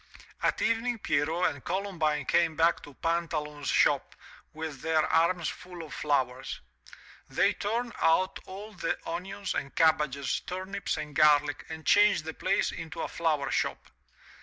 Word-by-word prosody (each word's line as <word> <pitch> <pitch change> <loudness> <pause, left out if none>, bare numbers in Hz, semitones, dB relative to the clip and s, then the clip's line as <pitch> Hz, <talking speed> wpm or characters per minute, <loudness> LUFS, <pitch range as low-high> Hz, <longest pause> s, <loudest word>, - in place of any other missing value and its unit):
At - - +1
evening 230 +1 +1
Pierrot 160 -1 +1
and 140 -2 -11
Columbine 165 -6 -1
came 165 +2 +2
back 165 +2 +3
to 145 - -13
Pantaloon's 150 -3 -2
shop - - +2 0.4
with 155 -4 -6
their 160 -1 +2
arms 170 +1 +2
full 180 -2 -7
of 155 - -10
flowers. 130 -4 -1 0.7
They - - +3
turned 235 +3 -2
out 185 +4 +3
all 205 +3 -8
the 175 -3 -2
onions 195 +3 -4
and 140 - -4
cabbages, 150 -4 +2
turnips 190 +2 -4
and 150 -2 -6
garlic, 150 -1 +4
and 160 -1 -7
changed 205 -4 +5
the 160 - -4
place 195 +5 +1
into 165 0 -6
a - - -2
flower 155 -5 0
shop. - - -2
165 Hz, 145 wpm, -29 LUFS, 150-185 Hz, 0.7 s, changed